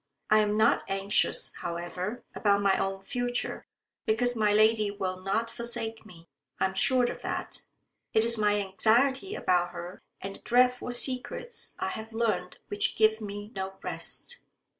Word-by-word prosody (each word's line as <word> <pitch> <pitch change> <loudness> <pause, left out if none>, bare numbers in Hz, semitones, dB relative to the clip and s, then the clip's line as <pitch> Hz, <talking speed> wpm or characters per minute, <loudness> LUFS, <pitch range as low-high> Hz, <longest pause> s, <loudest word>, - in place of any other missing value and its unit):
I 215 - +7
am 210 0 +1
not 220 - +3
anxious, 195 +1 +2
however, 175 +6 -5
about 200 -1 +2
my 195 -1 +4
own 195 0 -2
future, 245 +1 -3 0.4
because 245 +3 +2
my 215 -2 +2
lady 215 0 +4
will 190 -2 -4
not 220 +5 -1
forsake 230 -2 -4
me. 170 -4 -16 0.3
I - - +3
am 190 - -2
sure 255 +6 +3
of 240 - -2
that. - - -4 0.5
It 220 0 +3
is 235 0 +4
my 210 -2 +2
anxiety 245 - +2
about 175 - +1
her 175 +2 -8 0.2
and 195 0 -6
the - - -22
dreadful 250 +1 +2
secrets 255 - -1
I - - -2
have 220 +1 -7
learned 210 -6 -1
which 205 - +2
give 220 0 +3
me 205 0 -7
no 190 0 -5
rest." 485 0 -1
215 Hz, 160 wpm, -28 LUFS, 195-235 Hz, 0.5 s, I